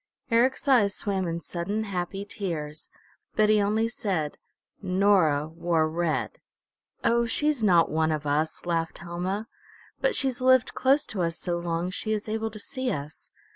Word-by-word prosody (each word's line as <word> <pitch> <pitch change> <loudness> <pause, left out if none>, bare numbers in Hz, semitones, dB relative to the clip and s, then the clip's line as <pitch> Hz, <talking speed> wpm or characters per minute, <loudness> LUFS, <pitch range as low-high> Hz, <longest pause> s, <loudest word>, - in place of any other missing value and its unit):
Eric's 255 +4 +2
eyes 220 -7 +4
swam 190 -3 -1
in 170 0 -3
sudden, 200 +7 -3
happy 195 0 -4
tears, 160 -8 -5 0.5
but 215 0 +4
he 215 -1 +5
only 215 +3 +1
said, 190 -10 -2 0.4
"Nora 185 -6 +3
wore 165 0 0
red." 160 0 -1 0.6
"Oh, 235 0 +3
she's 295 +2 +1
not 175 -6 +4
one 160 0 +2
of 155 -1 -2
us," 155 +4 -1
laughed 165 -1 -1
Helma. 185 +4 -4 0.5
"But - - +1
she's 260 -2 0
lived 260 -1 +4
close 270 +3 +3
to 195 - -4
us 165 0 -1
so 175 -1 -2
long, 170 +1 -2
she 215 +3 -2
is 210 0 -3
able 220 +1 -2
to 215 - -10
see 260 +4 -4
us. 150 -6 -6
190 Hz, 160 wpm, -27 LUFS, 165-220 Hz, 0.6 s, he